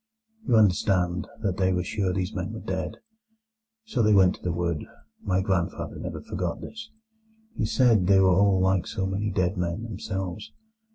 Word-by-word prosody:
"You - - +4
understand 90 -4 +2 0.2
that 95 -4 0
they 95 -1 +2
were 90 -1 0
sure 95 -1 -1
these 95 +2 -2
men 95 +2 -4
were 110 - -5
dead. 95 -3 -4 0.9
So 140 - -1
they 105 -1 +4
went 95 -2 +5
to - - -14
the 90 - -1
wood—my 85 +2 -3
grandfather 95 -3 -2
never - - -6
forgot 90 -2 -3
this. 225 0 -9 0.7
He - - -1
said 115 -8 +3
they 95 0 +6
were 95 -1 +5
all 100 0 +4
like 95 -1 +2
so 95 - -2
many 100 +2 -1
dead 95 0 0
men 90 +4 -2
themselves. 95 -3 -5
95 Hz, 170 wpm, -26 LUFS, 90-105 Hz, 0.9 s, they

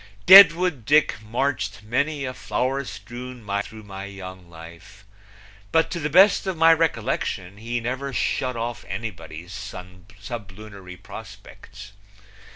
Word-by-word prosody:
Deadwood 180 - +8
Dick 150 -3 +2
marched 110 -2 -2
many 140 +6 -1
a 130 - -4
flower 130 +2 -2
strewn 120 +4 -9
mile 100 -1 -2
through 110 +1 -11
my 100 -1 -8
young 95 -2 -10
life, 85 0 -14 0.7
but 160 0 +2
to 170 - -3
the 150 -1 -2
best 195 +5 +5
of 190 -3 -2
my 165 +1 +6
recollection 100 - -2
he 120 +3 -3
never 130 +4 -4
shut 130 0 -1
off 115 0 -4
anybody's 90 -4 -7 0.6
sublunary 100 -3 -9
prospects. 105 - -12
115 Hz, 125 wpm, -23 LUFS, 100-140 Hz, 0.7 s, Deadwood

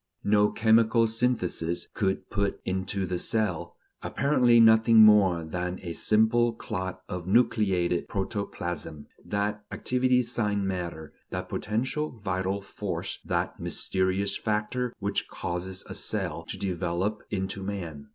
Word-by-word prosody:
No 105 0 +4
chemical 115 +1 +4
synthesis 110 -7 -1
could 95 -2 -1
put 100 -1 -1
into 95 +1 -1
the 90 -1 -2
cell, 90 -7 -1 0.3
apparently 125 -4 +3
nothing 110 0 +7
more 95 -6 +5
than 90 +3 -3
a 85 -2 -4
simple 110 +5 +3
clot 95 -4 -5
of 90 -1 -5
nucleated 95 -6 +2
protoplasm, 90 -6 -4 0.2
that 105 +1 -2
activity 125 0 +2
sine 105 -4 -1
matter, 85 -5 -4 0.2
that - - -5
potential 130 +8 -2
vital 95 -1 -2
force, - - -5
that - - -2
mysterious 95 +1 0
factor 110 +3 -1
which 100 0 -2
causes 90 +2 -4
a - - -6
cell - - -3
to - - -5
develop 95 +2 -2
into 95 -1 -3
man. 90 -7 -5
100 Hz, 120 wpm, -27 LUFS, 90-110 Hz, 0.3 s, nothing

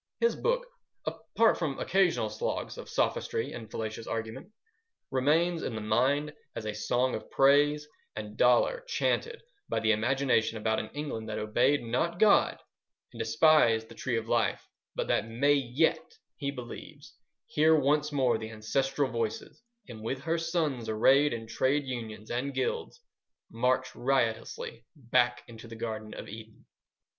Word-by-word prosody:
His 465 - +2
book - - 0 0.4
(apart 230 -1 +1
from 150 -5 -2
occasional 190 0 +1
sloughs - - -3
of - - -9
sophistry 460 -2 -1
and 110 -2 -8
fallacious 110 0 -5
argument) 115 - -5 0.6
remains 160 +6 +2
in 115 - -3
the 110 - -4
mind 135 +8 +1 0.2
as 110 - -5
a 105 - -2
song 120 +4 0
of - - -5
praise 145 +2 +4 0.3
and 105 0 -6
dolour 125 - +3
chanted 465 -1 -1 0.3
by - - 0
the 110 0 +2
imagination 115 0 +1
about 110 0 0
an 110 - -5
England 140 -7 -4
that 105 - -3
obeyed 120 +6 +2
not 125 +9 -1
God 210 +1 +4 0.6
and 115 - -10
despised 115 -1 +4
the - - -10
Tree 120 +1 -2
of 115 0 -4
Life, 115 -1 0 0.3
but - - -2
that - - +1
may 135 +6 +3
yet, 145 - 0 0.2
he 140 -2 -3
believes, 125 -4 -9 0.3
hear 155 +1 +4
once 150 +2 +2
more 130 -5 +2
the 110 0 -6
ancestral 135 +5 -1
voices, 115 - -3 0.3
and 115 -4 -9
with 130 +4 -3
her 165 +3 0
sons 160 -8 -1
arrayed 135 +7 +4
in 115 -1 -4
trade 130 +6 0
unions 110 -4 -6
and 130 +4 -2
guilds, 470 0 -2 0.5
march - - 0
riotously 480 0 -1
back 120 -2 +1
into 115 0 -11
the 115 - -9
Garden 110 -1 -5
of - - -8
Eden. 110 +1 -11
130 Hz, 150 wpm, -29 LUFS, 110-150 Hz, 0.6 s, praise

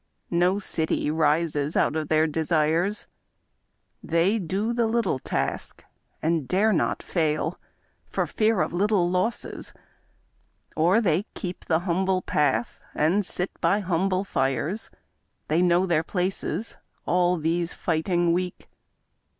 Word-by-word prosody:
No 180 +3 +3
city 160 -6 -1
rises 155 -1 +1
out - - +2
of 155 -1 -2
their 155 0 +3
desires; 160 +4 0 1.0
They 170 +7 +2
do 200 +6 -1
the 235 -1 +1
little 220 - 0
task, - - -3 0.4
and 160 -4 0
dare 210 - +3
not 170 - 0
fail 160 0 -1 0.5
For - - -1
fear 215 -2 +1
of - - -1
little 185 -1 +2
losses 185 +6 -2 0.5
— - - -42 0.3
or 175 +8 +4
they 180 -1 +1
keep 180 -1 -6
The 160 0 +1
humble 185 +1 0
path 130 -6 0
and 175 +7 +2
sit 180 0 -2
by 205 +1 +2
humble 185 +1 0
fires; 145 - -1 0.6
They 160 +3 +3
know 180 +1 +3
their 170 -4 +2
places 190 +5 -2
— - - -44
all 180 0 +2
these 165 +2 0
fighting 175 +1 0
Weak! 180 0 -3
175 Hz, 130 wpm, -25 LUFS, 160-190 Hz, 1.0 s, or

